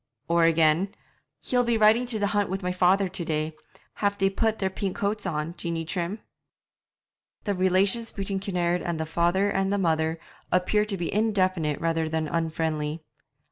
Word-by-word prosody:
Or 170 0 +3
again: 165 +5 +3 0.5
'He'll 245 -1 +2
be 235 -1 +1
riding 220 +3 +4
to 235 -2 -2
the 205 - 0
hunt 205 -1 +1
with 190 +1 -3
my 180 - 0
father 185 +2 +3
to 180 -1 -4
day; 155 -1 -2 0.4
have 200 -1 0
they 195 -1 +2
put 220 +2 0
their 190 -1 -1
pink 190 0 -3
coats 205 0 -1
on, 155 -1 -2
Jeanie 165 -1 -3
Trim?' 180 +5 -3 1.2
The 205 - 0
relations 190 +5 +2
between 195 -1 -3
Kinnaird 180 -3 0
and 170 -2 -3
the 160 - -1
father 175 +5 +1
and 195 0 0
mother 160 -2 +1 0.3
appeared 210 +4 +2
to 195 - 0
be 170 -2 -3
indefinite 185 -8 +1
rather 165 -1 0
than 160 0 -1
unfriendly. 160 -1 -2
185 Hz, 170 wpm, -26 LUFS, 165-200 Hz, 1.2 s, riding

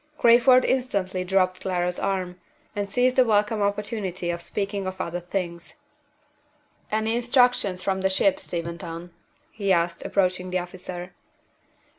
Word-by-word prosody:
Crayford 245 +1 +6
instantly 200 -8 0
dropped 185 0 +1
Clara's 180 -1 -1
arm, 185 -2 -2 0.3
and 205 -1 -2
seized 250 +5 +2
the 255 - +7
welcome 210 -1 +2
opportunity 200 -3 -2
of 170 0 -5
speaking 200 +1 -3
of 185 0 -5
other 175 0 -3
things. 175 -1 -5 1.2
"Any 220 +1 +1
instructions 240 -6 +2
from 190 -1 0
the 190 - +2
ship, 290 +10 +2
Steventon?" 170 - -5 0.4
he 200 -3 -1
asked, 170 -1 +1
approaching 185 -1 0
the 180 - 0
officer. 180 0 -6
190 Hz, 130 wpm, -25 LUFS, 180-215 Hz, 1.2 s, the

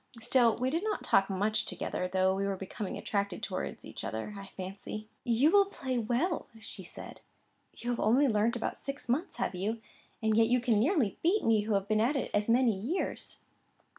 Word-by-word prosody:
Still 235 0 +3
we 255 +2 0
did 330 +5 0
not 430 -1 -1
talk 195 0 +3
much 215 +3 0
together, 180 - -2
though 190 0 +3
we 195 +1 -1
were 195 - -1
becoming 195 +1 -5
attracted 200 -3 -2
towards - - -4
each - - -8
other, 110 - -4
I 195 0 -8
fancy. 195 +3 -6 0.2
"You 245 +6 +3
will 400 0 +6
play 260 -10 -3
well," 250 - 0
said 190 -4 -9 0.6
she. - - -12
"You 245 - +1
have 240 - -2
only 255 +7 +4
learnt 225 +1 +2
about 240 - -3
six 280 +1 -6
months, 295 +10 -1
have - - -1
you? 205 +5 -2 0.4
And 220 -1 +1
yet 225 0 +5
you 250 +2 +3
can 235 -3 +2
nearly 255 - +2
beat 375 +6 +2
me, 220 -2 +3
who 215 -1 +1
have 195 0 0
been 215 0 +2
at 255 +7 +2
it 275 - -2
as 205 +2 +1
many 235 -2 +4
years." 245 - -3
225 Hz, 200 wpm, -31 LUFS, 200-255 Hz, 0.6 s, will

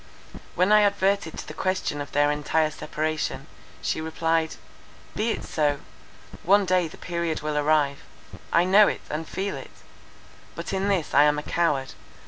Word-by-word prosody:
When 180 +4 +3
I 210 0 +7
adverted 200 -4 +1
to - - -7
the - - -7
question 185 -6 -2
of 145 - -7
their 145 0 +3
entire 155 +1 0
separation, 155 -3 -3 0.4
she - - -1
replied: 160 0 0 0.6
"Be 220 +2 0
it - - -2
so! 145 -2 0 0.6
One 200 +3 +4
day 180 -2 +2
the - - -13
period 170 -2 -3
will 150 0 -2
arrive; 145 -1 +2 0.5
I 170 - +4
know 200 +3 +6
it, - - -2
and 155 +1 -4
feel 195 +1 -3
it. - - -9 0.9
But - - -5
in 195 +1 0
this 190 -6 0
I 145 +1 +7
am 150 0 +3
a 150 - -3
coward. 145 -7 0
160 Hz, 165 wpm, -25 LUFS, 150-190 Hz, 0.9 s, I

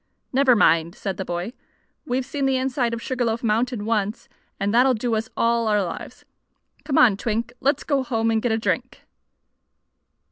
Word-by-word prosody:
"Never 260 -1 +5
mind," 165 -3 +3
said 195 -2 -4
the 190 - -4
boy. 175 +6 -4 0.5
"We've 255 0 -1
seen 275 0 -2
the 265 -1 +2
inside 255 -2 0
of 230 - -8
Sugar 255 -2 -2
Loaf 230 +1 -1
Mountain 230 0 0
once, 215 0 -1 0.3
and 200 +2 0
that'll 255 +2 +4
do 230 +1 -2
us 220 0 -1
all 230 0 +2
our 210 -2 +2
lives. 175 - -7 0.6
Come 280 - -1
on, 215 -6 +6
Twink. 230 +2 -2
Let's 280 +1 +1
go 280 -3 +1
home 225 -4 0
and 220 -1 +1
get 245 - 0
a 220 - +2
drink!" 225 - -2
230 Hz, 180 wpm, -23 LUFS, 210-255 Hz, 0.6 s, on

